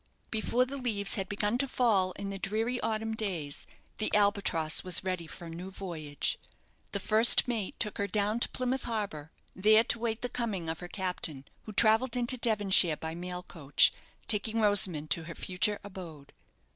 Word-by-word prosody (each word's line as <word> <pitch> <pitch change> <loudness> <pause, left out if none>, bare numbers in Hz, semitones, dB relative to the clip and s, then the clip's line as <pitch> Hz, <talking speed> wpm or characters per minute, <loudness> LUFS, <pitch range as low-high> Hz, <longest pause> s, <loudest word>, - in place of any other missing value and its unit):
Before 235 +3 +1
the 275 +2 -6
leaves 215 -6 -1
had 190 -2 -3
begun 205 +3 -1
to 275 - +1
fall 210 -8 +1
in 200 +1 -6
the 195 - -6
dreary 220 +6 -1
autumn 220 0 -2
days 180 -10 -4 0.3
the 215 - -1
"Albatross" 200 -6 +2
was 185 0 +3
ready 185 -3 -3
for 170 - -10
a - - -8
new 175 +3 -7
voyage. 160 -7 -4 0.5
The 200 - -2
first 220 +6 +5
mate 225 -6 -3
took 210 - -3
her 200 - 0
down 210 +3 0
to - - +2
Plymouth 255 +1 -2
Harbour, 200 -10 -4 0.2
there 215 +3 +5
to 235 - +1
wait 225 0 -3
the - - 0
coming 210 -9 -4
of 160 - -4
her 175 - -8
captain, 175 -7 -3 0.2
who 215 - -7
travelled 225 +4 +3
into 245 +1 +7
Devonshire 205 -8 +3
by 160 0 -6
mail 180 +1 -6
coach, 145 -6 +2 0.3
taking 220 +1 0
Rosamond 190 -8 +4
to 165 - 0
her 170 - -8
future 195 +3 -1
abode. 175 -8 -10
200 Hz, 180 wpm, -30 LUFS, 175-225 Hz, 0.5 s, into